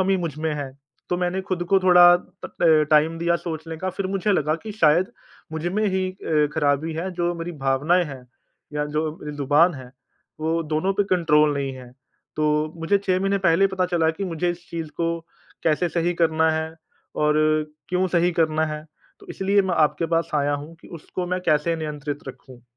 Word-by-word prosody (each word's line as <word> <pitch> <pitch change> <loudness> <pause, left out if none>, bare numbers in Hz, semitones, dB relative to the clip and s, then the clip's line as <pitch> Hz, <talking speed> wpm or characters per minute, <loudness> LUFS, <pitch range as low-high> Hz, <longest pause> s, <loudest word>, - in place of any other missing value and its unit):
कमी 190 +1 +2
मुझ 165 -5 -3
में 160 0 -1
है। 140 -2 -4 0.4
तो 180 - 0
मैंने 180 +1 -1
ख़ुद 180 -2 -1
को 195 - +7
थोड़ा 180 -1 +7 0.4
ट 155 -3 +3
टाइम 155 +2 +3
दिया 170 0 +1
सोचने 160 -1 -6
का 185 +3 -3
फिर 190 +1 -3
मुझे 195 +2 0
लगा 155 -3 +1
कि 215 - -6
शायद 170 -2 +3 0.5
मुझमें 175 +7 -1
ही 190 0 0
अ, 155 -5 0
ख़राबी 150 +1 +1
है। 180 +4 -3
जो 175 0 -1
मेरी 170 +1 -5
भावनाएँ 150 +7 +2
हैं 135 -4 -9 0.5
या 150 0 0
जो 150 +1 -3
ज़ुबान 145 +5 +3
है 130 -2 -10 0.5
वो 165 +1 0
दोनों 155 +5 0
पे 205 - +1
कंट्रोल 155 -5 +3
नहीं 135 -1 -2
है। 125 -1 -11 0.5
तो 155 0 +1
मुझे 200 +5 +2
6 185 -2 0
महीने 195 0 +1
पहले 190 +1 +3
ही - - +4
पता 185 -1 -1
चला 170 -3 +1
कि 195 +5 -5
मुझे 175 0 -1
इस 175 0 -8
चीज़ 165 -2 -4
को 170 0 -1 0.4
कैसे 165 +2 +1
सही 170 +1 0
करना 160 0 +3
है 160 0 -1 0.5
और 150 0 +3 0.5
क्यों 185 +1 +1
सही 175 0 +2
करना 160 -1 +1
है? 155 0 -5 0.4
तो - - -16
इसलिए 200 +1 +2
मैं 185 -2 -1
आपके 155 +1 +2
पास 165 - -1
आया 145 0 +1
हूँ 150 +3 -7
कि - - -15
उसको 180 +3 -5
मैं 180 +1 -2
कैसे 155 +2 +2
नियंत्रित 150 -2 -4
रखूँ? 130 -2 -12
165 Hz, 190 wpm, -23 LUFS, 150-180 Hz, 0.5 s, को